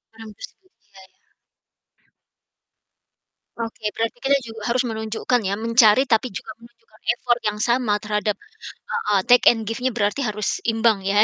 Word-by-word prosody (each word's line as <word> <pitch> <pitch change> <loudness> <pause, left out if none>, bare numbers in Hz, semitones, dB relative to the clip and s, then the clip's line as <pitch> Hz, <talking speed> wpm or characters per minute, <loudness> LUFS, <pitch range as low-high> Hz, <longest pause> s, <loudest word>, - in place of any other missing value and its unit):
Orang 225 -1 -11
tersebut, 390 -7 -13
Iya 200 -2 -20
iya. - - -41 2.3
Oke 225 -1 -6
berarti 225 +1 -2
kita 275 +1 +4
juga 225 -1 -9
harus 250 +2 +2
menunjukkan 220 +2 -1
ya, 195 0 -1
mencari 230 +2 +4
tapi 225 +1 +2
juga 200 +3 -7
menunjukkan 230 -2 -21 0.2
effort 240 0 0
yang 210 -1 -2
sama 240 -1 +1
terhadap 210 0 -1 0.6
heeh, 205 -2 +1
take 245 +4 +5
and 225 -2 +5
give-nya 225 +4 -2
berarti 210 +4 0
harus 210 -1 -2
imbang 225 -2 +2
ya. 200 +2 +3
225 Hz, 145 wpm, -22 LUFS, 210-240 Hz, 2.3 s, take